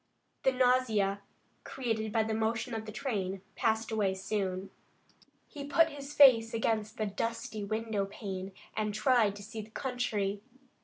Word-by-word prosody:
The 265 - +4
nausea 245 -6 +2 0.4
created 225 -4 -2
by 220 0 +2
the 220 0 -2
motion 225 +2 -1
of 220 -1 -4
the - - -5
train 200 -6 -3
passed 225 0 0
away 200 -3 +1
soon. 190 -1 -2 0.8
He 290 -3 -8
put 320 +3 +3
his 280 0 -8
face 240 -6 +7
against 220 -1 0
the 215 - 0
dusty 215 +1 -3
window 215 -1 -1
pane 195 -2 -6 0.2
and 210 -1 -1
tried 230 -5 +3
to 205 - -9
see 220 +1 -6
the 215 - -12
country. 215 -6 -2
220 Hz, 150 wpm, -31 LUFS, 205-245 Hz, 0.8 s, face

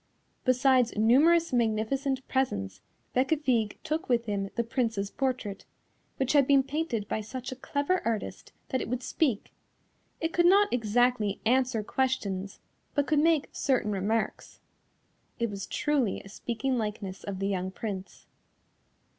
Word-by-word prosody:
Besides 255 -2 +3
numerous 305 +9 +4
magnificent 250 +4 0
presents, 100 - -1 0.3
Bécafigue 255 -5 +1
took 310 -1 -2
with 240 -1 +2
him 200 -2 -2
the 235 - +1
Prince's 230 -4 -1
portrait, 255 -7 -2 0.5
which 265 +1 0
had 280 -3 +5
been 275 -1 +5
painted 275 -8 -2
by 215 - -2
such 250 +4 -6
a - - -5
clever 285 +7 -1
artist 225 -2 -3 0.2
that 260 - 0
it - - -5
would 250 +1 -2
speak; 255 -8 -1 0.7
it 325 0 -2
could 345 0 +4
not 405 +3 +5
exactly 230 -2 +1
answer 250 -2 +2
questions, 205 -6 -1 0.4
but 285 -2 +2
could 300 -1 +2
make 320 -1 +3
certain 255 -6 0
remarks. 210 +3 -2 0.8
It 235 -2 -1
was 195 -1 -5
truly 285 -9 0
a 195 - -13
speaking 240 +4 -2
likeness 205 -3 -4
of 200 -2 -4
the 195 +1 -1
young 185 -1 -1
Prince. 195 -1 -6
245 Hz, 140 wpm, -28 LUFS, 210-270 Hz, 0.8 s, had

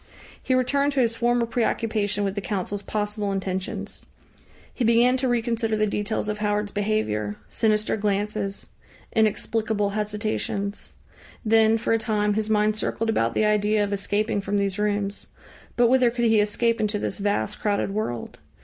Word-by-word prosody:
He 260 - +1
returned 280 +3 +2
to 275 - 0
his 230 -2 +2
former 240 0 +2
preoccupation 220 -3 0
with 195 -1 -1
the 200 - -3
Council's 200 +1 -3
possible 210 -1 -2
intentions. 190 -1 -4 0.7
He 255 - -2
began 235 +2 +4
to 260 0 0
reconsider 230 -2 0
the 215 - +2
details 210 +1 -2
of 210 0 -3
Howard's 210 0 0
behaviour, 200 - -1
sinister 215 -1 +1
glances, 205 -1 -2 0.4
inexplicable 220 -1 +1
hesitations. 210 0 -3 0.6
Then, 225 0 +4
for 225 - 0
a 225 - +2
time, 210 -2 +1
his 215 +1 -1
mind 210 0 +2
circled 225 +1 -1
about 115 - 0
the 215 - +3
idea 210 0 +2
of 205 0 -2
escaping 205 +1 0
from 205 +1 -1
these 200 0 -1
rooms; 205 -1 -1 0.5
but 240 -1 +4
whither 255 0 +4
could 240 0 -1
he 220 -1 +4
escape 230 +2 +1
into 210 0 0
this 210 - -3
vast, 200 - -1
crowded 200 -2 0
world? 120 - -4
210 Hz, 160 wpm, -24 LUFS, 205-225 Hz, 0.7 s, began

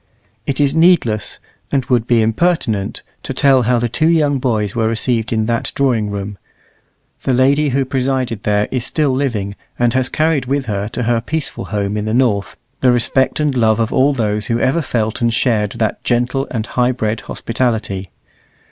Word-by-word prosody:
It 135 0 -1
is 140 -1 +3
needless, 160 - +2 0.3
and 135 -3 +1
would 120 -2 +1
be 115 -2 +3
impertinent, 115 - 0 0.2
to - - -5
tell 135 -2 +4
how 125 +1 +2
the 120 0 0
two 155 +7 0
young 150 -4 +2
boys 110 -6 -1
were 115 -1 +1
received 115 0 0
in 110 -1 +1
that 115 +3 -1
drawing 120 -7 +1
room. 100 -1 -5 0.8
The 130 - +1
lady 140 +4 +3
who 135 +1 0
presided 130 -4 -1
there 105 0 +1
is 125 -3 -1
still 150 +1 +1
living, 115 -7 -2 0.2
and 120 -1 +2
has 130 0 +1
carried 155 -5 0
with 140 0 -1
her 105 -2 -2
to 125 +3 -3
her 115 0 +1
peaceful 160 +5 -4
home 105 0 -2
in 105 - -2
the 110 +1 -1
north 115 -6 +1 0.2
the 125 - +4
respect 125 +4 +1
and 150 -2 +1
love 110 -3 +2
of 115 0 0
all 140 +2 +4
those 105 -3 -1
who 115 0 0
ever 135 +7 +1
felt 115 -5 -2
and 115 0 +2
shared 110 -4 +1
that 110 -2 -2
gentle 125 +3 0
and 110 -3 -3
high 125 +1 +1
bred 110 -2 -2
hospitality. 110 -6 -2
120 Hz, 185 wpm, -17 LUFS, 110-135 Hz, 0.8 s, tell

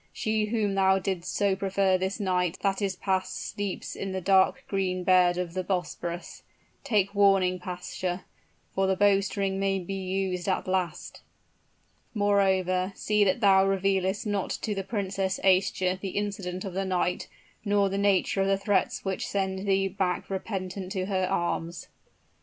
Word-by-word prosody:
She 215 -1 0
whom 210 -2 0
thou 190 0 +4
didst 185 -2 -3
so 200 -2 +1
prefer 195 0 +1
this 190 +3 -2
night 180 -3 0
that 195 0 +1
is 195 -2 -1
passed 185 0 -1
sleeps 205 -2 -4
in 195 -1 -4
the 190 - -1
dark 190 +1 +3
green 185 -2 -1
bed 180 -1 +4
of 180 -2 -3
the 185 0 -2
Bosporus. 175 -2 -4 0.4
Take 200 -3 +1
warning, 195 -3 +3
pasha; 180 0 -4 0.5
for 195 0 +1
the 190 - +2
bowstring 195 0 +2
may 195 0 +1
be 190 +1 -5
used 190 -1 -2
at 185 - -1
last. 185 -3 -2 0.9
Moreover, 190 -2 +2
see 210 -1 +2
that 195 +4 +1
thou 195 -2 +6
revealest 195 +1 0
not 205 -2 -1
to 215 - -2
the 195 -1 -3
Princess 195 -2 -2
Aischa 185 -1 +2
the 195 0 -5
incident 195 -2 -3
of 190 - -5
the 195 +1 -1
night, 180 -1 -1 0.4
nor 205 -1 +2
the 195 +1 -2
nature 200 -1 +2
of 195 - +1
the 195 0 +2
threats 195 -1 0
which 190 -1 -2
send 190 0 -2
thee 195 0 +2
back 190 -1 -2
repentant 190 -1 -4
to 185 -2 -1
her 190 -1 0
arms.'" 170 0 -2
190 Hz, 160 wpm, -27 LUFS, 185-200 Hz, 0.9 s, thou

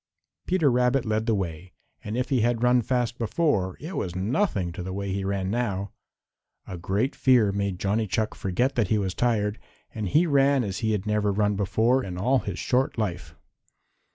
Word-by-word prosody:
Peter 170 -7 +3
Rabbit 125 +1 +2
led 110 +1 -1
the 115 - +3
way, 90 -1 -5 0.3
and 105 +3 -4
if 125 - -1
he 130 -4 +2
had 120 +1 +1
run 125 0 +4
fast 120 0 -1
before 115 - 0
it 165 +6 -7
was 90 -2 -3
nothing 100 - 0
to 90 - -7
the 95 +1 -5
way 100 0 -3
he 100 0 -2
ran 95 -1 -2
now. 100 -4 -2 0.7
A 95 - -7
great 100 +9 -1
fear 120 -6 +4
made 100 -2 -2
Johnny 105 +4 0
Chuck 110 +3 -1
forget 120 +9 -1
that 115 -6 +1
he 110 - +2
was 95 -3 -1
tired, 110 -3 0 0.3
and 105 -2 -3
he 160 - +4
ran 140 -3 +3
as 100 -3 -4
he 110 -1 0
had 105 -1 -2
never 105 -1 +1
run 105 +1 +1
before 115 +6 +2
in 90 -4 -6
all 125 +8 +2
his 100 -6 -5
short 130 +5 0
life. 90 -6 -3
110 Hz, 195 wpm, -26 LUFS, 95-125 Hz, 0.7 s, run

